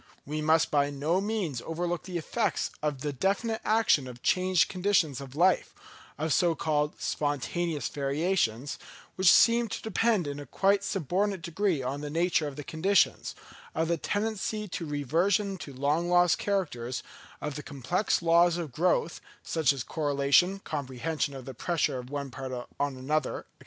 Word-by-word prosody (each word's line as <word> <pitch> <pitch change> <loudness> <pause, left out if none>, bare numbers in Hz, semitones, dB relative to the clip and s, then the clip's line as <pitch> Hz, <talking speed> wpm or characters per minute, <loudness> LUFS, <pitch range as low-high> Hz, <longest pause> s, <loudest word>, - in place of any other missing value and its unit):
We 150 +2 -3
must 160 +1 +3
by 145 -1 +3
no 150 +6 0
means 195 - -2
overlook 175 +1 -3
the 180 -2 -4
effects 205 +5 -1
of 150 -3 -2
the 145 0 -2
definite 200 - 0
action 215 -11 +3
of 120 -1 -10
changed 185 -1 +3
conditions 180 -8 +1
of 135 -1 -10
life, 180 +4 +2 0.4
of 155 0 0
so 175 -3 +3
called 150 -2 -1
spontaneous 150 +3 -1
variations, 140 - -1 0.4
which 185 -1 +6
seem 235 0 +5
to - - -4
depend 220 -3 +1
in 145 0 -4
a 145 - -9
quite 195 +7 +2
subordinate 195 +1 -1
degree 170 -3 0
on 135 +3 -3
the 150 - -5
nature 165 0 +1
of 140 - -7
the 150 - -6
conditions, 185 +7 +1 0.4
of 160 +1 0
the 170 - +2
tendency 215 +1 -2
to 170 -1 -4
reversion 175 - +1
to 145 - -8
long 145 +6 0
lost 175 -1 +4
characters, 130 -12 -2 0.4
of 150 - -4
the 150 - -5
complex 160 - -1
laws 170 +1 +4
of 165 -5 -4
growth, 170 +3 0 0.2
such 160 -3 +2
as 135 -4 -3
of - - -24
correlation, 145 +5 +2
comprehension, 140 +1 -3
of 130 -2 -8
the 135 - -7
pressure 145 0 -1
of 125 0 -9
one 140 -1 -4
part 130 -1 -6 0.3
on 140 -2 -1
another, 140 +2 -1
&c. - - -40
160 Hz, 165 wpm, -28 LUFS, 140-185 Hz, 0.4 s, which